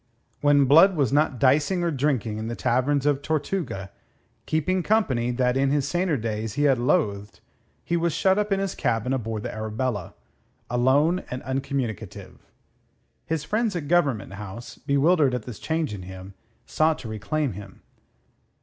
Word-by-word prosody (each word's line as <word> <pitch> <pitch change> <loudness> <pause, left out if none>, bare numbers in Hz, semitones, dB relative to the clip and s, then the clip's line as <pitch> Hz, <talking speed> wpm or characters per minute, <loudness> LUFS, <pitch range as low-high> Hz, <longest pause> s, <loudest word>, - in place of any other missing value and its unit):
When 145 -1 +4
Blood 165 +8 +6
was 140 -4 +1
not 145 -2 +2
dicing 145 +8 +2
or 170 - +1
drinking 130 -7 -1
in 110 - -4
the 115 - -4
taverns 130 +5 +1
of 145 -1 +2
Tortuga, 155 - -3 0.6
keeping 170 +4 0
company 145 - +1
that 125 0 +1
in 135 0 +2
his 140 -1 +1
saner 175 -1 0
days 110 -2 -3
he 145 - 0
had 135 -4 +3
loathed, 115 - 0 0.5
he 170 - 0
was 170 0 +1
shut 190 +6 +2
up 210 0 -1
in 195 - +2
his 195 -1 -2
cabin 120 +2 -1
aboard 115 -4 -3
the - - -5
Arabella, 110 -1 -3 0.6
alone 140 +9 +2
and 125 - -5
uncommunicative. 130 -5 -4 0.9
His 160 -2 -1
friends 215 +2 -1
at 155 -4 -4
Government 140 - +1
House, 105 +3 -8
bewildered 140 -1 +2
at 125 - -4
this 120 -4 -9
change 160 -6 -2
in 100 - -6
him, 95 +1 -10 0.3
sought 155 0 +1
to - - -9
reclaim 125 +7 -2
him. 100 0 -11
135 Hz, 160 wpm, -25 LUFS, 115-160 Hz, 0.9 s, Blood